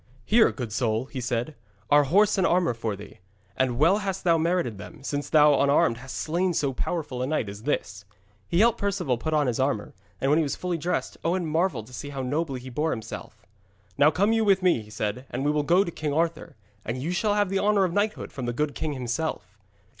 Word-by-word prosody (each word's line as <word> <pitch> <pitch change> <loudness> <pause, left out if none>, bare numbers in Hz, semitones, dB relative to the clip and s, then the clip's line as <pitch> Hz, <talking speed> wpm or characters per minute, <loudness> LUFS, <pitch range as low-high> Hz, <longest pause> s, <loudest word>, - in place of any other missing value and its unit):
'Here, 225 +1 +5
good 120 -5 -6
soul,' 115 0 0
he 130 -1 -6
said, 120 +4 -2 0.4
'are 145 0 +6
horse 205 +7 +3
and 185 - +3
armour 175 -6 +2
for 115 -2 -3
thee. 100 +1 -12 0.4
And 130 -2 0
well 170 - +4
hast 195 -3 -3
thou 170 -2 +4
merited 165 - 0
them, 140 +7 -11
since 145 +1 -3
thou 150 -2 +5
unarmed 140 -5 +3
hast 135 +2 -8
slain 175 +2 0
so 140 -2 0
powerful 135 -2 -3
a 130 - -1
knight 150 -7 -1
as 100 +1 -8
this.' 100 -7 -2 0.4
He 170 - +2
helped 235 0 +3
Perceval 185 - -1
put 155 +4 -1
on 150 -1 +3
his 125 -2 -1
armour, 130 -6 -1 0.3
and 135 - +1
when 155 - +4
he - - +3
was 145 - -2
fully 180 -2 -3
dressed 175 +4 -2
Owen 175 +1 0
marvelled 160 - 0
to 125 - -16
see 145 +4 -6
how 135 -2 -4
nobly 140 0 -2
he 130 +1 -9
bore 150 +6 0
himself. 110 -6 -7 0.5
'Now 145 +1 +5
come 200 +8 +2
you 225 -1 +2
with 195 -3 +3
me,' 175 -11 +3
he 105 - -14
said, 105 +4 -4
'and 130 +3 -3
we 145 - +3
will 150 0 +1
go 175 +6 +4
to 170 - -5
King 150 -3 -3
Arthur, 165 +1 -1 0.3
and 120 +3 -4
you 155 +7 -2
shall 205 +4 +1
have 205 -2 +2
the 195 0 0
honour 205 -1 +3
of 180 -2 0
knighthood 210 +2 -1
from 130 -3 -5
the 120 - -1
good 150 +3 -1
king 155 -2 -3
himself.' 130 +5 -4
150 Hz, 230 wpm, -26 LUFS, 125-175 Hz, 0.5 s, are